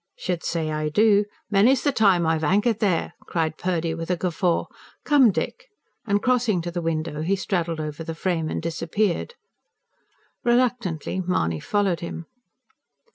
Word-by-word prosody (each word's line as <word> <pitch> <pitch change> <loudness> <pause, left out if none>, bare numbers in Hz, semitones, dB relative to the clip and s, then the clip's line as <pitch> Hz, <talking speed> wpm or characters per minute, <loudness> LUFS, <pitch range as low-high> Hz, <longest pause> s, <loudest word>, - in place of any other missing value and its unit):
"Should 180 -2 -2
say 160 -2 -1
I 155 0 -1
do! 205 +4 +4 0.3
Many's 230 +7 +4
the 285 - +3
time 195 -8 +3
I've 160 0 +1
anchored 205 +7 +2
there," 185 -6 0
cried 160 -2 -1
Purdy 170 -2 -1
with 165 +1 -6
a 180 - +1
guffaw. 175 0 0 0.4
"Come, 285 -5 +6
Dick!" - - -3 0.4
And 205 0 +1
crossing 245 -6 +2
to 175 - -4
the 175 0 -3
window 155 -2 -2
he 185 +5 +1
straddled 170 -4 -2
over 155 +1 -5
the 165 0 -5
frame, 165 -2 -1
and - - -3
disappeared. 170 - -1 1.1
Reluctantly 240 - 0
Mahony 85 - 0
followed 195 - 0
him. 170 0 -6
175 Hz, 150 wpm, -24 LUFS, 165-210 Hz, 1.1 s, Come